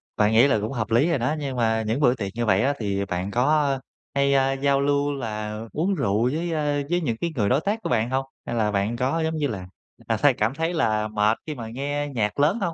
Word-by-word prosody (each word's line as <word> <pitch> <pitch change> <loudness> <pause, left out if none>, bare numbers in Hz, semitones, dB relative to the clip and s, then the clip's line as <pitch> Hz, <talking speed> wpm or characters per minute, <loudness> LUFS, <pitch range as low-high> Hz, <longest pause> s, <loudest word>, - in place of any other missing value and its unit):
tại 105 +1 +3
nghĩ 115 +5 +6
là 110 -6 +2
cũng 110 +4 -3
hợp 115 -4 -3
lý 130 +9 +4
rồi 165 -5 +1
đó, 130 +6 0
nhưng 140 -3 -4
mà 110 -1 +2
những 115 +6 0
bữa 125 -3 +4
tiệc 100 -5 -4
như 120 0 -1
vậy 95 -2 +3
á 140 +4 +2
thì 100 -2 -1
bạn 90 +1 -3
có 145 +5 +2 0.5
hay, 140 0 +3
a, 135 0 +3
giao 140 0 +1
lưu 145 0 +1
là 105 -5 -4
uống 185 +6 0
rượu 110 - +1
với, 165 +2 -2
a, 145 -2 0
với 175 +1 +1
những 115 -8 -1
cái 170 - -1
người 105 -6 +1
đối 130 +4 +3
tác 205 +6 -1
của - - -2
bạn 110 +2 +1
hông? 135 +1 0 0.2
Hay 120 - -3
là 110 -2 +1
bạn 100 +3 0
có, 130 +7 0
giống 160 0 -1
như 150 -2 0
là, 95 -7 -5 0.4
à, - - +1
thấy - - +4
cảm 110 +4 0
thấy 165 +4 -1
là 110 -9 +1
mệt 105 +1 +1
khi 155 - -4
mà 115 -4 -6
nghe 145 +4 -3
nhạc 105 +1 -1
lớn 155 +10 +3
hông? 170 -4 -1
130 Hz, 265 wpm, -24 LUFS, 110-145 Hz, 0.5 s, nghĩ